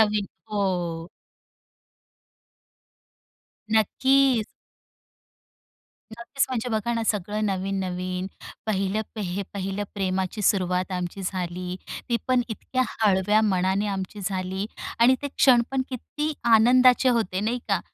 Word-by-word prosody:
नवीन. 210 -2 +2 0.2
हो. 175 -5 -1 2.6
नक्कीच. 260 +2 +3 1.7
नक्कीच, 235 +5 -1
म्हणजे 250 -2 -2
बघा 220 +1 0
ना 230 - -1
सगळं 210 +1 -1
नवीन-नवीन. 185 -1 -2 0.4
पहिलं 195 0 0 0.2
हे 190 0 -2
पहिलं 195 +1 -3
प्रेमाची 190 +1 -1
सुरुवात 185 -1 +1
आमची 180 +1 -4
झाली. 180 -1 -3 0.3
ती 235 - +2
पण 255 -1 +3
इतक्या 255 +3 -2
हळव्या 210 0 +2
मनाने 190 0 +1
आमची 195 +1 -4
झाली 190 +1 -2 0.3
आणि 240 +3 +6
ते 285 - -2
क्षण 255 -3 +5
पण 270 -1 0
किती 295 +4 -3 0.2
आनंदाचे 250 +3 +6
होते 220 -6 +1
नाही 230 +4 0
का. 200 -3 +2
205 Hz, 105 wpm, -25 LUFS, 185-235 Hz, 2.6 s, आणि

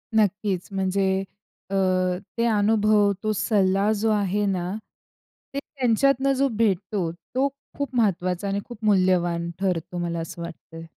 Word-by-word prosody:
नक्कीच. 205 -3 +1
म्हणजे 190 0 0 0.6
अ, 195 - -2 0.6
ते 230 - +2
अनुभव, 210 -1 +3
तो 215 - +1
सल्ला 200 -1 +2
जो 225 +1 +1
आहे 205 0 +1
ना, 185 -3 0 0.9
ते 280 - -1
त्यांच्यातनं 275 +1 +1
जो 275 - +4
भेटतो 195 -4 0 0.2
तो 270 +2 +3 0.3
खूप 285 -3 -3
महत्वाचा 185 -4 +1
आणि 200 +1 0
खूप 235 -2 -11
मूल्यवान 180 -4 +2
ठरतो 180 -2 -1
मला 170 -1 -2
असं 165 +1 -6
वाटतंय. 165 -1 -9
200 Hz, 130 wpm, -24 LUFS, 180-220 Hz, 0.9 s, जो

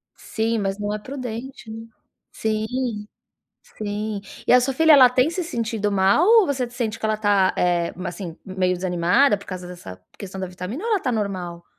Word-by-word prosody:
Sim, 225 +1 -2
mas 195 -1 -2
não 205 0 -3
é 210 - -3
prudente, 255 -1 -7
né. 225 +1 -8 0.4
Sim, 220 0 -2 1.0
sim. 210 0 -5 0.3
E - - +4
a 250 - +7
sua 260 +1 -1
filha, 320 +2 +5
ela 265 -4 +9
tem 255 +4 +2
se 360 +2 -3
sentido 225 - -2
mal? 200 - +3
Ou 445 -3 +6
você 260 -4 -1
sente 230 -3 -3
que - - -8
ela 215 - +1
tá, 205 -3 +3
eh, 175 -1 +1
mas 180 -1 -5
assim 175 -5 -7
meio 185 -1 0
desanimada 180 +7 +2
por 200 - -15
causa 185 -1 -6
dessa 135 - -10 0.2
questão 190 -1 -7
da 185 - -2
vitamina? 180 - -6
Ou 465 - -1
ela 415 - +2
tá 265 - -1
normal? 185 -5 -3
215 Hz, 195 wpm, -22 LUFS, 185-250 Hz, 1.0 s, ela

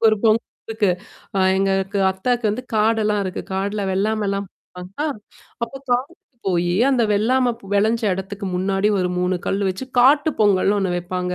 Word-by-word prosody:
ஒரு 215 - +3
பொங்கல் 220 +1 +3 0.2
இருக்கு. 220 -4 +1 0.5
அ - - +2 0.2
எங்களுக்கு 195 0 0
அத்தக்கு 235 +5 -1
வந்து 240 +5 -3
காடெல்லாம் 215 -1 +2
இருக்கு. 185 - -4
காடுல 200 +2 -2
வெள்ளாமைலாம் 200 0 -1 0.3
பாப்பாங்களா! 185 +12 -5 0.6
அப்ப 230 - -2 0.2
காட்டுக்கு 265 +3 -3
போயி, 175 -1 +1 0.2
அந்த 255 -3 +2
வெள்ளாம 245 +4 +2 0.2
வெளஞ்ச 220 +3 +2
இடத்துக்கு 195 +2 -6
முன்னாடி 195 +2 +1
ஒரு 180 - +1
3 180 +1 +1
கல் 195 - 0
வச்சு, 190 +8 -6 0.2
காட்டு 290 +5 +5
பொங்கல்ன்னு 205 -1 +3
ஒண்ணு 185 -2 0
வைப்பாங்க. 180 +1 -3
205 Hz, 150 wpm, -21 LUFS, 190-225 Hz, 0.6 s, காட்டு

